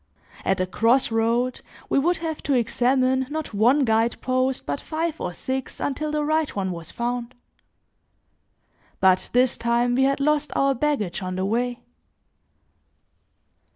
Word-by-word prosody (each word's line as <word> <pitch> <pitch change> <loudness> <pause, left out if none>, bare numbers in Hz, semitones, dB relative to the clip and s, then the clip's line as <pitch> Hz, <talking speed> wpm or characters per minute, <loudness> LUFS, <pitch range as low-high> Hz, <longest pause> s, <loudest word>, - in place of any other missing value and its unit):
At 190 0 +1
a 185 - +1
cross 230 +7 +2
road, 230 +3 0 0.3
we - - +2
would 345 +5 +1
have 320 -2 -4
to 275 - +4
examine 255 +2 +2
not 310 -4 -4
one 245 +7 +4
guide 225 +1 +1
post, 255 0 0
but 145 0 -3
five 325 0 -3
or - - -2
six 260 +9 -4
until 300 +2 -2
the 300 -1 0
right 310 0 0
one 190 -2 -1
was 170 -2 -6
found. 240 0 -3 1.6
But 185 -1 +3
this 250 0 +3
time 235 +1 +1
we 265 +2 +3
had 275 +1 +1
lost 300 +1 +1
our 275 0 +3
baggage 255 -9 -1
on 185 0 -4
the 185 +1 -1
way. 240 +3 -1
250 Hz, 150 wpm, -24 LUFS, 225-275 Hz, 1.6 s, to